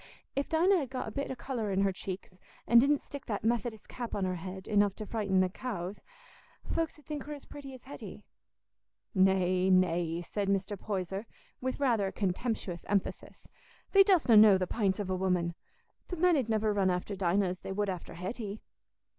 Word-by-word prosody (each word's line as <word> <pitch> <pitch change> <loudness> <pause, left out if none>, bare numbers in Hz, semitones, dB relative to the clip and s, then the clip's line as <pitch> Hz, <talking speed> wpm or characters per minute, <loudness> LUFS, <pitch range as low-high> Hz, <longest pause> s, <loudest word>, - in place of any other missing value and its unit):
If 275 - -1
Dinah 355 +5 +4
had 275 -5 -3
got 255 -3 -4
a - - -5
bit 280 +5 -3
o' 265 - -3
colour 235 -4 -3
in 195 0 +1
her 195 0 +3
cheeks, 190 +1 -6 0.3
an' 235 - +7
didn't 280 +3 +3
stick 285 -1 -9
that 205 -3 -2
Methodist 225 -1 -1
cap 240 -2 -5
on 195 - 0
her 185 -1 -1
head, 185 +2 -7
enough 205 -2 +3
to 215 - -6
frighten 200 -4 +1
the 185 - +3
cows, 200 -3 -5 0.6
folks 330 -1 -2
'ud 300 - -20
think 300 -2 -5
her 300 - -5
as 285 - -9
pretty 285 -2 -9
as 255 - -14
Hetty." 280 - -9 0.9
"Nay, 185 -1 +3
nay," 175 -2 +2
said 200 +3 -3
Mr. 195 +1 0
Poyser, 195 +1 -4 0.3
with 260 +1 -2
rather 235 -8 +2
a - - -3
contemptuous 195 -2 -2
emphasis, 200 -1 -2 0.4
"thee 395 0 +8
dostna 360 - +4
know 210 -2 +9
the 185 - 0
pints 195 -1 0
of 195 -2 -2
a - - +1
woman. 180 -2 0 0.5
The 360 - -4
men 355 +1 +4
'ud 255 -6 0
niver 215 -1 +2
run 195 -2 +2
after 180 +3 -2
Dinah 190 +1 +2
as 180 0 -5
they - - -6
would 205 +1 0
after 180 -3 -5
Hetty." 205 +3 -5
205 Hz, 195 wpm, -31 LUFS, 185-250 Hz, 0.9 s, know